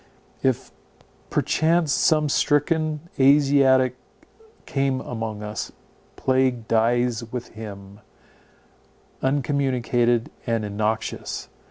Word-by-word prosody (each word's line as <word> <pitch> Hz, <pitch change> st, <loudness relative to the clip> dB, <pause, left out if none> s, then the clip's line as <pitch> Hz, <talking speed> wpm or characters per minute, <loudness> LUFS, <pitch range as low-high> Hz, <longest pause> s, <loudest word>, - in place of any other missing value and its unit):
If 130 Hz, -2 st, 0 dB, 0.6 s
perchance 160 Hz, 0 st, +2 dB
some 155 Hz, -1 st, +3 dB
stricken 155 Hz, +2 st, +1 dB, 0.2 s
Asiatic 135 Hz, -2 st, +4 dB, 0.7 s
come 135 Hz, -1 st, 0 dB
among 110 Hz, -4 st, -5 dB
us, 105 Hz, 0 st, -5 dB, 0.4 s
plague 130 Hz, -3 st, +1 dB
dies 120 Hz, +1 st, +2 dB
with 125 Hz, -1 st, -5 dB
him, 100 Hz, -2 st, -10 dB, 1.2 s
uncommunicated 125 Hz, -3 st, +1 dB, 0.2 s
and 115 Hz, -2 st, 0 dB
innoxious. 110 Hz, +2 st, -3 dB
125 Hz, 75 wpm, -23 LUFS, 115-140 Hz, 1.2 s, Asiatic